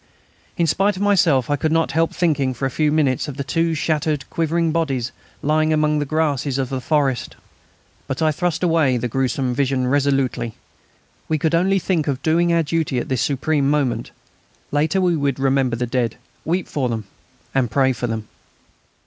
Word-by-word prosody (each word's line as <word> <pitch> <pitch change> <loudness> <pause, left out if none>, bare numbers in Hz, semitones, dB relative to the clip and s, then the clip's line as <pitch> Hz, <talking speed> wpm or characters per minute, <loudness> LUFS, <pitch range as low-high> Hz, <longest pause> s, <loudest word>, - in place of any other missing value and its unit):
In 170 - +2
spite 195 +5 +2
of 185 - -6
myself 170 - +3
I 145 - +1
could 155 +2 -1
not 165 0 +2
help 165 +1 +1
thinking 145 -7 0
for 135 - -3
a 135 - -1
few 150 +1 +1
minutes 145 -5 +1
of 145 -2 -6
the 140 - -2
two 165 +3 0
shattered, 150 -2 -1
quivering 165 0 0
bodies 135 -7 -1 0.3
lying 155 +1 +2
among 150 -1 +2
the 145 - -2
grasses 145 -3 0
of 130 -2 -1
the 130 -1 -3
forest. 135 -1 0 0.7
But 135 -2 -3
I 160 -1 +3
thrust 175 +2 -1
away 160 -7 +3
the 120 +1 -2
gruesome 130 +1 -1
vision 130 -1 0
resolutely. 130 -4 0 0.7
We 155 - +2
could 160 +2 0
only 190 +4 +3
think 175 -4 0
of 135 -2 -2
doing 170 +2 +2
our 170 -1 +3
duty 155 -3 -1
at 120 - -3
this 130 -3 0
supreme 140 0 +1
moment. 145 -4 0 0.6
Later 155 +6 +1
we 180 -2 +2
would 140 -4 0
remember 135 -2 +2
the 125 +1 -1
dead, 120 -2 -1 0.3
weep 175 +2 -1
for 130 -4 -1
them, 110 -2 -3 0.5
and 130 -3 +1
pray 130 +3 +2
for 120 +1 -3
them. 110 -2 -4
145 Hz, 185 wpm, -21 LUFS, 130-160 Hz, 0.7 s, myself